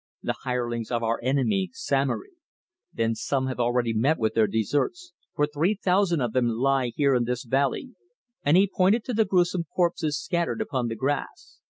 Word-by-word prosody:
"The - - -1
hirelings 120 -3 -3
of 120 -1 -1
our 115 0 0
enemy, 140 - +1
Samory." 145 - -1 0.6
"Then 115 0 0
some 130 +4 -1
have 130 -1 -4
already 120 -1 +1
met 130 +9 +2
with 110 -1 0
their 110 -1 +3
deserts, 145 - -1 0.2
for 150 - +3
three 155 +8 0
thousand 185 -4 +1
of 120 -3 -1
them 125 -2 +2
lie 125 +2 +1
here 140 -2 +3
in 120 -2 +2
this 125 0 -2
valley," 135 - 0 0.5
and 150 +5 +4
he 195 +2 +5
pointed 200 +4 +2
to 250 - -4
the 220 0 +3
gruesome 180 -2 +1
corpses 170 -4 0
scattered 170 +2 -1
upon 135 - -1
the 115 - -3
grass. 135 +5 -4
140 Hz, 180 wpm, -26 LUFS, 120-180 Hz, 0.6 s, he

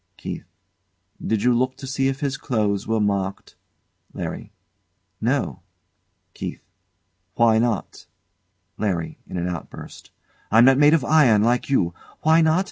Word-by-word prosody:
KEITH. - - -7 0.8
Did 110 -2 -1
you 125 - +4
look 130 +2 0
to 135 - -9
see 135 0 0
if 135 +2 -3
his 140 -2 -1
clothes 105 -8 -1
were 110 0 +1
marked? 100 -2 -2 0.6
LARRY. - - -6 0.7
No. - - -1 0.7
KEITH. - - -7 0.7
Why 115 -1 +4
not? 115 -3 -2 0.7
LARRY. 90 -6 -2
[In - - -6
an 85 0 -2
outburst] 90 -2 -8 0.4
I'm 115 +3 +6
not 135 +1 +5
made 150 +2 +6
of 150 - 0
iron, 130 -10 +4
like 120 +3 +1
you. 85 -11 +1 0.3
Why 160 +1 +4
not? 160 +2 +3
120 Hz, 135 wpm, -22 LUFS, 105-135 Hz, 0.8 s, I'm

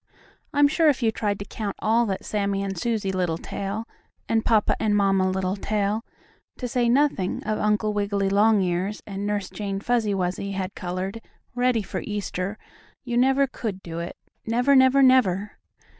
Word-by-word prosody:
I'm 290 -2 +5
sure 315 +2 +3
if 265 -4 0
you 225 - +3
tried 205 -2 -1
to 200 - -7
count 205 -1 -5
all 230 +2 +2
that 190 -2 -3
Sammie 200 -1 -1
and 195 -1 -3
Susie 210 +1 -1
Littletail, 190 +4 -3 0.4
and 225 -1 +1
Papa 220 -2 +3
and 210 -1 +1
Mamma 195 -2 +3
Littletail, 200 +3 -1 0.5
to 250 - -3
say 240 0 +1
nothing 250 -8 +1
of 215 0 -1
Uncle 210 0 +1
Wiggily 200 -1 0
Longears 200 -2 +2
and 200 0 -4
Nurse 205 -2 -2
Jane 200 -2 -3
Fuzzy 220 -2 +1
Wuzzy 190 +2 -2
had 190 0 -3
colored, 185 +4 -4 0.3
ready 245 -2 +1
for - - -4
Easter, 205 -1 -3 0.5
you 245 -3 -3
never 265 +3 +4
could 215 -7 -5
do 165 -1 -6
it, 170 +1 -6 0.3
never, 245 +5 +2
never, 260 +1 +6
never! 210 -7 +3
205 Hz, 160 wpm, -24 LUFS, 195-235 Hz, 0.5 s, never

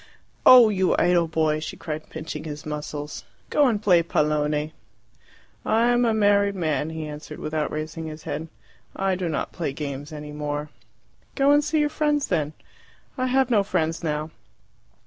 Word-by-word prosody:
"Oh, 245 -3 +10
you 190 -3 +2
idle 175 -1 +3
boy!" 155 -1 +1
she 155 - -6
cried, 155 -1 -6
pinching 155 -1 -6
his 150 -1 -7
muscles. 150 -2 -5 0.3
"Go 290 -2 +4
and 225 -4 +1
play 185 -5 +4
pallone." 150 -1 0 0.9
"I 230 +2 +2
am 245 0 +3
a 230 - +3
married 200 -1 +3
man," 155 -4 -1
he 160 -1 -5
answered, 150 0 -8
without 155 0 -2
raising 155 +1 -5
his 155 0 -8
head. 155 +2 -4 0.5
"I 195 0 0
do 180 -2 -2
not 155 - -2
play 160 -6 -3
games 145 0 -5
any 150 -1 -7
more." 150 0 -4 0.6
"Go 275 +1 +4
and 290 +1 +5
see 305 +1 0
your 295 - +2
friends 295 -2 0
then." 155 -4 0 0.6
"I 255 -1 -1
have 260 0 +2
no 215 -3 +5
friends 165 -4 -1
now." 155 0 -2
160 Hz, 165 wpm, -24 LUFS, 150-205 Hz, 0.9 s, Oh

